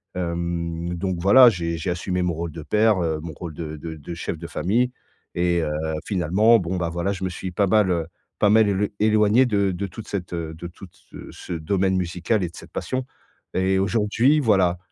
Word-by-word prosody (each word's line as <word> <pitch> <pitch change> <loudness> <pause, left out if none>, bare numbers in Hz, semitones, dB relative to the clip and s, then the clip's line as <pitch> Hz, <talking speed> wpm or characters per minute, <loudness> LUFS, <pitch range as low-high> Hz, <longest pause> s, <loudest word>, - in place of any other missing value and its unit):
Hem, 85 -1 -3
donc 90 0 -2
voilà 120 +7 +8
j'ai 85 -4 -3
j'ai 85 +3 -2
assumé 90 +1 -2
mon 90 - 0
rôle 85 0 -4
de 80 -1 -8
père, 105 +6 +3
heu, 80 -1 -1
mon 80 -1 -7
rôle 80 +1 -7
de 80 -1 -6
de 80 +1 -7
de 75 +3 -8
chef 85 -1 -4
de 85 - -7
famille, 115 +9 0 0.4
et 85 0 +1
heu, 75 - -1 0.4
finalement 100 +5 +4
bon, 90 +1 -3
bah 85 -1 -1
voilà, 85 +3 -2
je 95 0 -6
me 95 - 0
suis 90 +1 -6
pas 100 +2 +1
mal, 105 -2 +3
heu 85 -2 -1 0.3
pas 105 - +4
mal 110 -1 +5
élo 100 +1 +1
éloigné 110 +3 +4
de 100 -4 +1
de 95 +2 -3
toute 105 +5 -10
cette, 90 -3 -5
heu, 80 -2 -4
de 85 +2 -7
toute 90 +1 -14 0.2
ce - - -10
ce 90 - -8
domaine 95 +4 0
musical 90 +3 -1
et 85 - -2
de - - -17
cette - - -12
passion. 130 0 -3 0.5
Et 95 +1 +2
aujourd'hui, 115 +8 +2
voilà, 95 -9 +3
90 Hz, 215 wpm, -23 LUFS, 85-100 Hz, 0.5 s, voilà